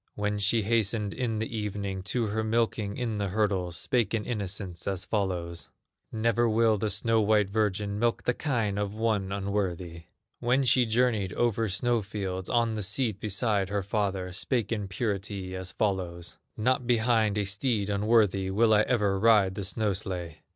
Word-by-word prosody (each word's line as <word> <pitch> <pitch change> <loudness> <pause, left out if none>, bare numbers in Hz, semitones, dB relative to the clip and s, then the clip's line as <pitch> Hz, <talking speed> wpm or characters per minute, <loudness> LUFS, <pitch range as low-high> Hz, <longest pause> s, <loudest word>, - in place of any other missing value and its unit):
When 105 0 -1
she 105 +3 +2
hastened 105 -1 0
in 120 -4 -2
the 110 +1 -3
evening 100 -2 -3
To 120 +3 0
her 110 +1 -1
milking 110 -2 0
in 115 -4 -2
the 100 - -1
hurdles, 95 -4 0
Spake 115 +5 0
in 110 - -2
innocence 100 -5 -4
as 95 0 -1
follows: 90 -5 -2 0.4
"Never 115 +1 +1
will 110 -1 +3
the 110 - 0
snow 115 +1 +2
white 105 -2 +2
virgin 105 -1 0
Milk 120 0 +1
the 125 - +1
kine 115 -8 -1
of 105 0 -3
one 110 -4 0
unworthy!" 95 -4 -3 0.3
When 125 +3 +2
she 125 -1 +4
journeyed 110 -5 +1
over 115 -2 +1
snow 120 +4 +1
fields, 95 -2 -4
On 115 -2 +2
the 110 - -3
seat 105 +1 0
beside 100 -1 0
her 100 -1 -1
father, 95 -3 -2
Spake 115 +5 -1
in 105 -3 -2
purity 100 -2 -3
as 95 0 -4
follows: 90 -4 -2 0.2
"Not 125 +2 +1
behind 110 -3 +2
a 105 - +1
steed 105 0 0
unworthy 100 -2 +2
Will 110 +3 +3
I 105 - +5
ever 105 -5 +1
ride 105 -3 +4
the 100 0 -4
snow 105 +1 0
sledge!" 90 -4 -4
105 Hz, 170 wpm, -28 LUFS, 95-115 Hz, 0.4 s, I